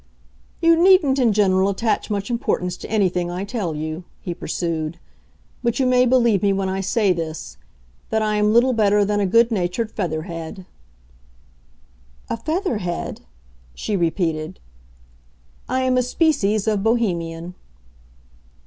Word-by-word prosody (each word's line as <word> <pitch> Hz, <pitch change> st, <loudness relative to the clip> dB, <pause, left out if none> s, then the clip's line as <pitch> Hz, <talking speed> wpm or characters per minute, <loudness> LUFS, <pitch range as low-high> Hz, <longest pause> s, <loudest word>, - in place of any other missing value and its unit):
"You 330 Hz, 0 st, +5 dB
needn't 345 Hz, -8 st, +5 dB
in 240 Hz, -3 st, +4 dB
general 195 Hz, -2 st, +3 dB
attach 210 Hz, +2 st, -1 dB
much 205 Hz, +2 st, -2 dB
importance 180 Hz, -6 st, -1 dB
to -, -, -9 dB
anything 180 Hz, -5 st, +1 dB
I 180 Hz, +2 st, -4 dB
tell 200 Hz, -6 st, -3 dB
you," 155 Hz, +3 st, -4 dB, 0.2 s
he 175 Hz, -, -5 dB
pursued; 165 Hz, -1 st, -3 dB, 0.6 s
"but 235 Hz, 0 st, -1 dB
you 265 Hz, -, +2 dB
may 250 Hz, 0 st, +4 dB
believe 235 Hz, -6 st, +3 dB
me 200 Hz, -, +3 dB
when 195 Hz, 0 st, -1 dB
I 190 Hz, +1 st, -2 dB
say 200 Hz, 0 st, +2 dB
this,—that 65 Hz, -, -6 dB
I 215 Hz, -1 st, 0 dB
am 210 Hz, 0 st, +3 dB
little 240 Hz, +3 st, +4 dB
better 205 Hz, -2 st, +3 dB
than 205 Hz, +1 st, 0 dB
a 200 Hz, -, +1 dB
good 230 Hz, +4 st, +4 dB
natured 205 Hz, +2 st, -1 dB
feather 160 Hz, -7 st, -3 dB
head." 170 Hz, +2 st, -7 dB, 1.7 s
"A -, -, -1 dB
feather 315 Hz, -, -2 dB
head?" 175 Hz, -2 st, -4 dB, 0.5 s
she 205 Hz, -, -3 dB
repeated. 165 Hz, -2 st, -1 dB, 1.1 s
"I 260 Hz, +1 st, 0 dB
am 255 Hz, 0 st, +2 dB
a -, -, +3 dB
species 245 Hz, -, +1 dB
of 210 Hz, -2 st, +1 dB
Bohemian." 175 Hz, -7 st, -1 dB
200 Hz, 140 wpm, -21 LUFS, 175-235 Hz, 1.7 s, You